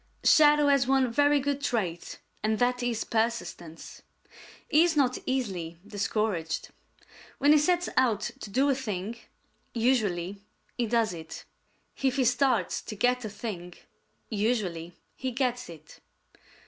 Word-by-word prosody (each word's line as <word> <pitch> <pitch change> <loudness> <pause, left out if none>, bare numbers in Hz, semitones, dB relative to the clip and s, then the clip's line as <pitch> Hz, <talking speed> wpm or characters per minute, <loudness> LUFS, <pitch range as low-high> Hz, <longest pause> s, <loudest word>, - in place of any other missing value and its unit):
Shadow 295 -1 +6
has 275 -3 +3
one 265 -2 +3
very 290 +3 +4
good 285 0 -2
trait, 190 -11 -2 0.2
and 215 0 0
that 245 +1 +1
is 240 -2 -1
persistence. 220 -8 -3 0.7
He 310 +3 +5
is 340 -3 +1
not 255 -3 +2
easily 190 -11 -2
discouraged. 205 -5 -2 0.7
When 285 +2 +4
he 305 - +7
sets 355 +3 +1
out 225 -5 +2
to - - -8
do 265 +8 +2
a - - +3
thing, 220 -4 -4 0.6
usually 205 -6 0 0.3
he 240 -2 -1
does 225 -3 +1
it. 160 -1 -9 0.6
If 265 -1 +1
he 265 -2 +2
starts 245 -7 +1
to 215 - -8
get 250 +3 +1
a 215 - -4
thing, 195 -5 -7 0.5
usually 200 -7 -1 0.2
he 260 - -3
gets 245 -3 -2
it. 155 -2 -13
235 Hz, 135 wpm, -28 LUFS, 200-265 Hz, 0.7 s, he